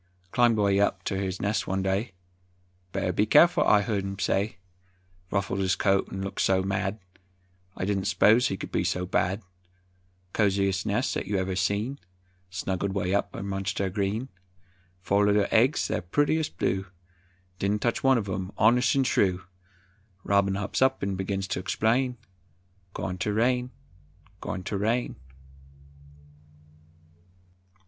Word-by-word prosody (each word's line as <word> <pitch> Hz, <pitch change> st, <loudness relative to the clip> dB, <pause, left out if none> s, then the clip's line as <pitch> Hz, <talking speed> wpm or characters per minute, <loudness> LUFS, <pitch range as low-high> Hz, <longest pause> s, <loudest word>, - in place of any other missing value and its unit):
Climbed 120 Hz, -2 st, +3 dB
way 100 Hz, -1 st, +3 dB
up 100 Hz, -1 st, +1 dB
ter 95 Hz, -, -2 dB
his 95 Hz, -1 st, -3 dB
nest 105 Hz, +1 st, -1 dB
one 95 Hz, 0 st, -1 dB
day, 95 Hz, +3 st, -1 dB, 0.8 s
"Better 90 Hz, -, -1 dB
be 105 Hz, +4 st, +1 dB
careful," 170 Hz, +9 st, +6 dB
I 105 Hz, -, +5 dB
heard 100 Hz, -3 st, -1 dB
him 95 Hz, 0 st, -5 dB
say; 95 Hz, +1 st, 0 dB, 0.7 s
Ruffled 100 Hz, -1 st, -1 dB
his 95 Hz, -1 st, +1 dB
coat 95 Hz, -1 st, +1 dB
'n 95 Hz, 0 st, -4 dB
looked 100 Hz, -, -3 dB
so 95 Hz, -1 st, +2 dB
mad, 95 Hz, +1 st, -1 dB, 0.8 s
I -, -, -2 dB
didn't 100 Hz, -1 st, -1 dB
'spose 115 Hz, +4 st, +4 dB
he 95 Hz, -, -3 dB
could -, -, -7 dB
be -, -, 0 dB
so 90 Hz, 0 st, -1 dB
bad. 95 Hz, +3 st, 0 dB, 0.9 s
Coziest 100 Hz, -1 st, +1 dB
nest 110 Hz, +6 st, 0 dB
'at -, -, -4 dB
ever 95 Hz, -2 st, -1 dB
you -, -, -2 dB
seen, 100 Hz, +8 st, -1 dB, 0.5 s
Snuggled 95 Hz, +1 st, -2 dB
way 95 Hz, -1 st, -1 dB
up 100 Hz, -, -1 dB
amongst 95 Hz, 0 st, -3 dB
ther 95 Hz, -1 st, -1 dB
green; 105 Hz, +6 st, -2 dB, 0.7 s
Four 100 Hz, +1 st, +2 dB
little 105 Hz, -1 st, +3 dB
eggs, 120 Hz, +6 st, +3 dB
ther -, -, -1 dB
purtiest 145 Hz, -, 0 dB
blue, 95 Hz, 0 st, -1 dB, 0.7 s
Didn't 100 Hz, +2 st, 0 dB
touch 120 Hz, -, 0 dB
one 135 Hz, -1 st, +5 dB
uv 100 Hz, -4 st, -2 dB
'em, 95 Hz, +1 st, -4 dB
honest 125 Hz, +5 st, +4 dB
'n 135 Hz, -, +3 dB
true! 95 Hz, -7 st, +1 dB, 0.8 s
Robin 100 Hz, 0 st, +2 dB
hops 100 Hz, +4 st, -3 dB
on 130 Hz, 0 st, +5 dB
'n 100 Hz, 0 st, -1 dB
begins 95 Hz, +1 st, -3 dB
ter -, -, -2 dB
explain, 120 Hz, +6 st, 0 dB, 0.8 s
"Goin' 90 Hz, -1 st, -4 dB
ter 105 Hz, -, -1 dB
rain, 125 Hz, +3 st, +1 dB, 0.7 s
goin' 90 Hz, -, -5 dB
ter 100 Hz, -, -3 dB
rain!" 115 Hz, +5 st, 0 dB
100 Hz, 150 wpm, -27 LUFS, 95-110 Hz, 0.9 s, careful